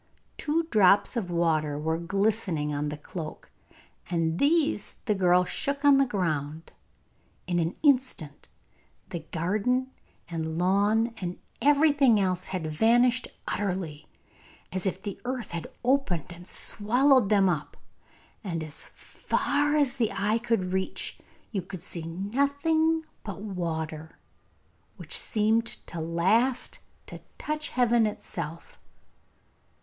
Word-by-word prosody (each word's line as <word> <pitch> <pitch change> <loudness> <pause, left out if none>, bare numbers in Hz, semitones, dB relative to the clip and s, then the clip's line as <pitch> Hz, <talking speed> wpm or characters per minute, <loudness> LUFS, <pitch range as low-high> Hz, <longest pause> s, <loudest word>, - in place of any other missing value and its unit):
Two 320 +3 0
drops 200 +2 +5
of 210 -7 -2
water 160 -4 +1
were 160 +2 -1
glistening 190 -5 0
on 145 +1 -1
the 150 - -5
cloak, 155 +1 -8 0.6
and 165 -1 0
these 295 -7 +2
the 215 - +2
girl 180 -2 +4
shook 280 +8 -2
on 280 -1 +7
the 275 - +3
ground. 160 -7 -2 0.7
In 175 -1 0
an 165 +2 -1
instant 255 - +1 0.6
the 170 - -4
garden 215 +10 0 0.4
and 160 -1 -3
lawn 205 +6 +2
and 180 -3 -4 0.2
everything 285 -5 +5
else 185 -2 0
had 185 -4 -4
vanished 235 +10 +3 0.2
utterly, 180 -7 -3 0.6
as 185 +1 -2
if 185 - -2
the 205 -2 -6
earth 250 -1 -4
had 170 -1 -4 0.2
opened 235 - +1
and 175 +1 -12
swallowed 245 +2 +3
them 200 -2 +4
up, 165 -5 -2 0.7
and 170 -5 -3
as 155 -1 -6
far 290 +1 -1
as 285 -3 +2
the 230 -4 +1
eye 210 +4 +1
could 225 -6 -1
reach 190 0 -2 0.3
you 200 -5 -1
could 180 -1 -9
see 165 -2 -3
nothing 280 - +1 0.2
but 200 -1 -6
water, 160 -5 -4 0.8
which - - -3
seemed 225 +2 +1 0.2
at 170 - -4
last 215 +10 +1 0.3
to - - -10 0.2
touch 305 0 -3
heaven 240 -3 +3
itself. 170 -5 -7
195 Hz, 125 wpm, -27 LUFS, 170-245 Hz, 0.8 s, on